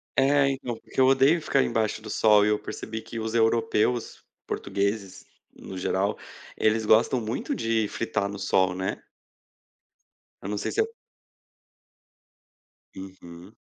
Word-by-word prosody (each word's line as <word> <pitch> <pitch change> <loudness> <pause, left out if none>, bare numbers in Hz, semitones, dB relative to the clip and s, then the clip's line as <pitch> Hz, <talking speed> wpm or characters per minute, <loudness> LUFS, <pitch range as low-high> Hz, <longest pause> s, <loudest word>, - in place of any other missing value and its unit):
É 135 +1 +4
então, 125 -4 -5
porque - - -7
eu 130 - +6
odeio 135 +5 +4
ficar 135 -2 +2
embaixo 110 -2 -1
do 110 - -9
sol 105 -1 +4
e - - +2
eu 105 - +1
percebi 110 0 -6
que 115 +1 -7
os 110 0 -4
europeus, 115 +1 +1 0.2
portugueses, 100 -1 -3 0.3
no 95 - -10
geral, 95 +3 -1 0.4
eles 110 0 +1
gostam 115 +4 +4
muito 115 +3 -3
de 115 -2 0
fritar 100 -2 -2
no 100 - -6
sol, 95 -2 +1
né. 95 0 -4 1.4
Eu 100 - -6
não 105 - -2
sei - - -3
se 440 - +1
é... 450 +1 -3 2.0
Uhum. 95 0 -11
110 Hz, 140 wpm, -26 LUFS, 100-120 Hz, 2.0 s, eu